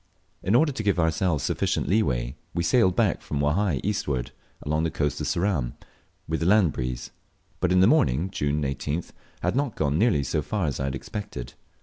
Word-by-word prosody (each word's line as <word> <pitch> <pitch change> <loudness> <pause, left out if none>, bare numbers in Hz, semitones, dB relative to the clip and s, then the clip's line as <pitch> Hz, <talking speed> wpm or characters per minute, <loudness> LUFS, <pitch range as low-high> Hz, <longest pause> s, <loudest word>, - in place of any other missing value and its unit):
In 100 +5 +1
order 150 +4 +4
to 130 - -4
give 100 -3 +1
ourselves 80 -1 +1
sufficient - - 0
leeway, 65 - +1 0.2
we 85 - +1
sailed 95 0 +3
back - - +2
from 75 - -3
Wahai 75 +2 +1
eastward, 70 -11 -1 0.3
along 75 +2 0
the 80 - +1
coast 75 -2 -1
of - - -2
Ceram, 85 -10 0 0.5
with 80 0 -1
the 80 - 0
land 100 -5 +5
breeze; 65 -1 -4 0.5
but 90 - +1
in 90 0 +5
the - - +7
morning 95 - +3
(June 75 -2 -1
18th) 70 +4 -3 0.3
had - - +1
not 140 -4 0
gone 75 0 0
nearly 105 -10 +3
so 75 +3 -1
far 100 +4 -2
as 70 -4 -2
I 70 - -1
expected. 65 -1 -5
80 Hz, 190 wpm, -26 LUFS, 70-100 Hz, 0.5 s, the